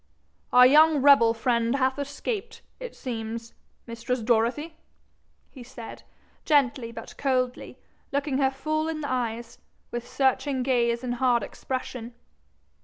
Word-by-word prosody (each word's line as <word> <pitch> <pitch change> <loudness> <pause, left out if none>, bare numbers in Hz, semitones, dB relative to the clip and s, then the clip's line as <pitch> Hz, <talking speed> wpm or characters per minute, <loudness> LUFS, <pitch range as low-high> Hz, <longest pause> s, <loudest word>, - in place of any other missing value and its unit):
'Our 250 0 +8
young 300 +1 +5
rebel 275 -5 +7
friend 235 +1 +1
hath 260 0 0
escaped, 400 - -5 0.2
it - - -8
seems, 230 -2 -6 0.3
mistress 235 +2 -3
Dorothy!' 245 +8 0 0.8
he 265 - -12
said, 240 -2 -10 0.4
gently 260 -5 +2
but - - -10
coldly, 255 -2 -1 0.3
looking 280 -1 -1
her 265 -1 +3
full 310 +4 -2
in 310 -1 -4
the 285 - -4
eyes, 235 -2 -3 0.3
with 240 0 -5
searching 265 0 0
gaze 240 -2 +1
and 245 -1 -2
hard 245 -2 +3
expression. 250 -2 -6
255 Hz, 125 wpm, -26 LUFS, 235-280 Hz, 0.8 s, Our